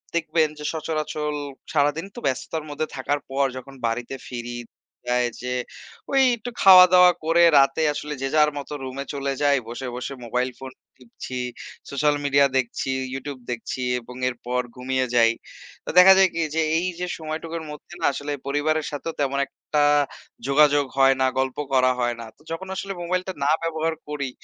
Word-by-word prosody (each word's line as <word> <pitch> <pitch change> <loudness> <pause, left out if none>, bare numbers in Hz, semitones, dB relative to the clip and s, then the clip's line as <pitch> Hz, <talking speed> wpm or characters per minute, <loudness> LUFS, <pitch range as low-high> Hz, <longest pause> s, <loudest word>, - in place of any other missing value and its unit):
দেখবেন 160 -1 +2
যে 150 - -7
সচরাচর 155 -1 -3 0.4
সারাদিন 145 +3 +1
তো - - -6
ব্যস্ততার 150 +4 -2
মধ্যে 145 +2 -3
থাকার 145 +2 -1
পর 135 +1 +1
যখন 135 +1 -10
বাড়িতে 120 +3 -3
ফিরি, 120 -1 -5 0.6
আ - - +3 0.2
যে 125 0 -3 0.6
ওই 275 - +4 0.2
একটু 230 +2 -6
খাওয়া 185 -1 +10
দাওয়া 180 0 +8
করে 170 +1 +4 0.2
রাতে 135 +3 +3
আসলে 150 0 -5
যে 135 - 0
যার 150 -1 +5
মতো 145 +1 -6
রুমে 130 +1 -5
চলে 140 -1 -2
যাই 140 -1 +4
বসে 125 +2 -5
বসে 125 +2 -5
মোবাইল 125 +2 -1
ফোন 135 0 -8 0.3
টিপছি, 125 +1 -8 0.5
সোশ্যাল 145 +1 +1
মিডিয়া 140 0 +5
দেখছি, 130 +1 -2 0.2
ইউটিউব 135 0 -6
দেখছি 120 +2 -5 0.2
এবং 125 +1 -12
এরপর 125 0 -3
ঘুমিয়ে 130 +1 -1
যাই। 115 -1 +5 0.5
তো - - -6
দেখা 190 +1 +10
যায় 190 -1 +6
কি - - -3 0.2
যে, 160 - +2 0.2
এই 175 +2 0
যে 180 - -1
সময়টুকুর 160 +1 -5
মধ্যে 150 +3 -11
না - - +1
আসলে 145 +2 -5 0.2
পরিবারের 150 +2 0
সাথেও 150 +3 -4
তেমন 140 0 0
একটা 150 -1 -1 0.6
যোগাযোগ 145 0 +4
হয় 135 0 +6
না, - - +4
গল্প 130 -1 -1 0.2
করা 130 -1 +4
হয় 120 -1 0
না। - - -7
তো - - -26
যখন 175 +4 -5
আসলে 195 +1 -4
মোবাইলটা 185 +2 -2
না 140 - +2
ব্যবহার 165 0 -1
করি, 145 -2 -3
145 Hz, 170 wpm, -24 LUFS, 130-160 Hz, 0.6 s, খাওয়া